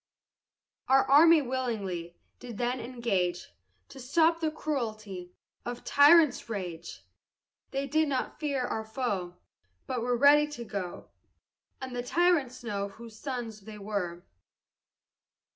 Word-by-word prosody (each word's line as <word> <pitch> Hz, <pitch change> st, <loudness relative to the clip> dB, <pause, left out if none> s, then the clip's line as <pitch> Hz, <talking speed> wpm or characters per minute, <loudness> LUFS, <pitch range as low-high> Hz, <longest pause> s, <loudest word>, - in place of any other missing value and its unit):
Our 270 Hz, 0 st, +5 dB
army 310 Hz, +3 st, +6 dB
willingly 205 Hz, -10 st, -3 dB, 0.2 s
Did 240 Hz, -4 st, -9 dB
then 245 Hz, +2 st, -1 dB
engage, 225 Hz, -8 st, -2 dB, 0.4 s
To 275 Hz, -, -12 dB
stop 320 Hz, +6 st, +2 dB
the 320 Hz, -1 st, 0 dB
cruelty 215 Hz, -12 st, -4 dB, 0.3 s
Of 245 Hz, 0 st, -6 dB
tyrants' 295 Hz, -3 st, +5 dB
rage! 175 Hz, -6 st, -6 dB, 0.6 s
They 275 Hz, +1 st, -2 dB
did 310 Hz, +2 st, +1 dB
not 265 Hz, -3 st, -2 dB
fear 280 Hz, -4 st, -1 dB
our 220 Hz, -2 st, -3 dB
foe, 210 Hz, -7 st, -3 dB, 0.5 s
But 250 Hz, -2 st, -3 dB
ready 280 Hz, +5 st, +5 dB
were -, -, -13 dB
to 240 Hz, -4 st, -7 dB
go, 195 Hz, -5 st, -6 dB, 0.7 s
And 260 Hz, -1 st, -7 dB
let 245 Hz, 0 st, -4 dB
the -, -, -8 dB
tyrants 295 Hz, -6 st, +2 dB
know 200 Hz, -3 st, -2 dB
Whose 220 Hz, +1 st, -13 dB
sons 240 Hz, -6 st, -5 dB
they 210 Hz, +2 st, -10 dB
were. 195 Hz, -4 st, -4 dB
245 Hz, 125 wpm, -29 LUFS, 205-275 Hz, 0.7 s, army